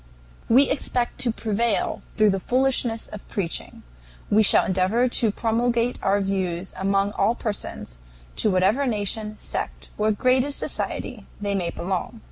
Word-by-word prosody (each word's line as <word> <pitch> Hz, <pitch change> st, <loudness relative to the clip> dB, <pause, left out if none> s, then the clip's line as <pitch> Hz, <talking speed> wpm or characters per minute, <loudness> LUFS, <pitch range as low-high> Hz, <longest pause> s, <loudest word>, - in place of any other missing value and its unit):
"We 260 Hz, +4 st, +6 dB
expect 250 Hz, -3 st, -1 dB
to 240 Hz, -, +2 dB
prevail 220 Hz, 0 st, 0 dB, 0.2 s
through 215 Hz, -1 st, +5 dB
the 195 Hz, -, -1 dB
Foolishness 250 Hz, 0 st, +1 dB
of 210 Hz, -, -10 dB
Preaching. 190 Hz, -6 st, -3 dB, 0.5 s
We 215 Hz, +1 st, +5 dB
shall 210 Hz, -, +5 dB
endeavor 190 Hz, +7 st, +2 dB
to 240 Hz, -2 st, +2 dB
promulgate 235 Hz, +2 st, 0 dB
our 200 Hz, +1 st, +2 dB
views 190 Hz, -2 st, -2 dB
among 195 Hz, +1 st, +1 dB
all 210 Hz, +3 st, +1 dB
persons, 200 Hz, -, -5 dB, 0.4 s
to 215 Hz, -, +3 dB
whatever 200 Hz, +9 st, +2 dB
nation, 215 Hz, -1 st, -1 dB
sect, -, -, -5 dB
or 215 Hz, +1 st, +3 dB
grade 255 Hz, +4 st, +3 dB
of 285 Hz, +1 st, -3 dB
society -, -, -4 dB
they 205 Hz, -1 st, -1 dB
may 180 Hz, -4 st, 0 dB
belong. 190 Hz, +7 st, -4 dB
215 Hz, 145 wpm, -24 LUFS, 195-240 Hz, 0.5 s, We